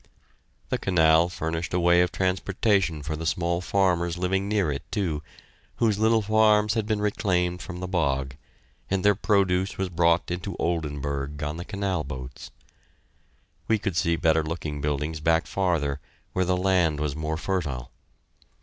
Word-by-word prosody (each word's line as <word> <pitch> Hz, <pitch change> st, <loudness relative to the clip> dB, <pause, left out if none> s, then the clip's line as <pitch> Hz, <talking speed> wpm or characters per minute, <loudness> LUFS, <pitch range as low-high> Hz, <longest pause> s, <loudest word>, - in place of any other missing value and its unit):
The -, -, -1 dB
canal 80 Hz, -2 st, +4 dB
furnished 80 Hz, 0 st, -3 dB
a -, -, +2 dB
way 85 Hz, 0 st, +5 dB
of 90 Hz, -, +1 dB
transportation 95 Hz, -2 st, 0 dB
for 75 Hz, +2 st, -3 dB
the 80 Hz, +1 st, -4 dB
small 85 Hz, +1 st, 0 dB
farmers 90 Hz, -3 st, +1 dB
living 95 Hz, +2 st, 0 dB
near 100 Hz, -7 st, +1 dB
it, 70 Hz, -, -3 dB
too, 90 Hz, -8 st, -1 dB, 0.5 s
whose 110 Hz, -3 st, +1 dB
little 110 Hz, 0 st, +3 dB
farms 105 Hz, 0 st, +4 dB
had 110 Hz, -2 st, -1 dB
been 110 Hz, -2 st, 0 dB
reclaimed 90 Hz, -4 st, 0 dB
from 90 Hz, -1 st, -7 dB
the 90 Hz, -, -3 dB
bog, 70 Hz, -7 st, -1 dB, 0.5 s
and 95 Hz, 0 st, 0 dB
their 105 Hz, -, +6 dB
produce 95 Hz, -2 st, +1 dB
was 95 Hz, -1 st, -1 dB
brought 85 Hz, 0 st, +2 dB
into 90 Hz, +1 st, -4 dB
Oldenburg 75 Hz, -3 st, -2 dB
on 75 Hz, +2 st, -3 dB
the 85 Hz, -, -6 dB
canal 100 Hz, -5 st, -2 dB
boats. 65 Hz, -2 st, -8 dB, 1.2 s
We 110 Hz, -, +3 dB
could 100 Hz, -4 st, -3 dB
see 85 Hz, 0 st, +2 dB
better 80 Hz, -1 st, +3 dB
looking 75 Hz, -2 st, -4 dB
buildings 75 Hz, +2 st, -2 dB
back 80 Hz, +2 st, +2 dB
farther, 80 Hz, -7 st, 0 dB, 0.3 s
where 95 Hz, -, +1 dB
the 90 Hz, +1 st, +1 dB
land 90 Hz, -5 st, +2 dB
was 75 Hz, -2 st, -2 dB
more 80 Hz, 0 st, -2 dB
fertile. 75 Hz, -10 st, -3 dB
85 Hz, 160 wpm, -26 LUFS, 80-95 Hz, 1.2 s, their